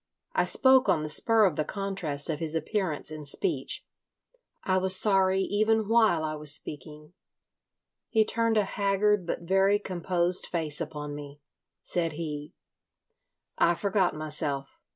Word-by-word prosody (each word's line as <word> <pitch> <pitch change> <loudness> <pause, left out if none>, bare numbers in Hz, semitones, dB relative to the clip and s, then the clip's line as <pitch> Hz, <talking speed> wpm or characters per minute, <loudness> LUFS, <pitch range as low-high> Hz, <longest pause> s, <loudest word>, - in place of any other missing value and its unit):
I - - +2
spoke 260 -1 +4
on 155 - +2
the 155 - -4
spur 225 +5 +4
of 175 -6 0
the 155 - +1
contrast 185 -6 -2
of 155 -2 -2
his 160 -1 -2
appearance 160 -3 -2
and 155 -2 -8
speech. 350 - -1 0.8
I 185 0 +1
was 185 0 +2
sorry 190 -1 +3
even 215 +2 +1
while 220 -8 +3
I 155 0 -2
was 150 -1 -4
speaking. 150 +2 -9 1.0
He 220 -2 +3
turned 230 0 0
a 210 - +4
haggard 200 -1 +1
but - - -3
very 195 +3 +3
composed 180 -2 +1
face 160 -3 -3
upon 150 -2 -5
me. 145 0 -9 0.4
Said 165 -3 -2
he: 150 -2 -6 1.0
"I 170 - +4
forgot 195 -2 0
myself. 150 -3 -4
175 Hz, 145 wpm, -27 LUFS, 150-200 Hz, 1.0 s, spoke